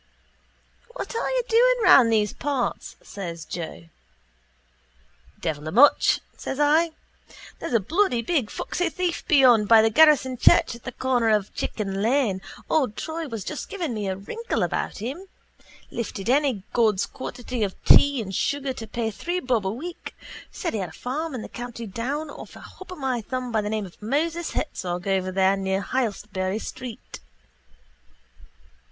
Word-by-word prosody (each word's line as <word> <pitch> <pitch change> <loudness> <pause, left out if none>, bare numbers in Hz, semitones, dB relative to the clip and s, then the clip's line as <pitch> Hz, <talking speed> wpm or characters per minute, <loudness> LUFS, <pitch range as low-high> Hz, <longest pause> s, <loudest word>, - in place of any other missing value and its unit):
—What - - -5
are - - -1
you - - 0
doing - - +5
round 245 - +7
those 210 -2 +2
parts? 275 -3 -3
says 170 -5 -7
Joe. 170 -1 -6 1.6
—Devil 155 -2 -3
a - - -3
much, 260 - +5
says 270 - -5
I. 315 +3 +3 0.7
There's 245 - -2
a - - +5
bloody 250 - +1
big 265 -5 0
foxy 355 -1 -2
thief 355 +1 -2
beyond 255 - +5
by 225 0 +7
the 225 - +3
garrison 265 -2 +5
church - - +5
at 235 - -12
the 255 - -4
corner 245 -2 +1
of 210 -2 +1
Chicken 195 -2 -3
lane—old 235 +2 0
Troy 320 0 -4
was 225 -6 -5
just 305 - -6
giving 350 - -3
me 210 -2 -3
a 190 - -1
wrinkle 450 - -3
about - - -2
him—lifted 240 - -7
any 265 -8 +2
God's 215 -5 +3
quantity 250 -2 -6
of 195 -2 -2
tea 280 -5 +6
and 195 -1 -7
sugar 275 +6 -1
to 225 -3 -8
pay 225 0 -2
three 345 - -3
bob 245 - 0
a - - 0
week 330 - -7 0.3
said 340 - -4
he 220 - -1
had 185 -3 -3
a - - -14
farm 290 - -4
in 230 - -5
the - - -7
county 240 -1 -7
Down 270 +9 -4
off - - -11
a - - -11
hop 375 - -13
of 365 - -7
my 260 -4 -1
thumb 255 +2 -4
by 220 -2 +1
the 210 - -3
name 215 -1 -2
of 180 - -14
Moses 320 +9 -1
Herzog 180 - -3
over 190 -1 0
there 190 +1 +3
near 190 0 -1
Heytesbury 205 -5 -2
street. 250 +1 -8
240 Hz, 165 wpm, -24 LUFS, 205-290 Hz, 1.6 s, round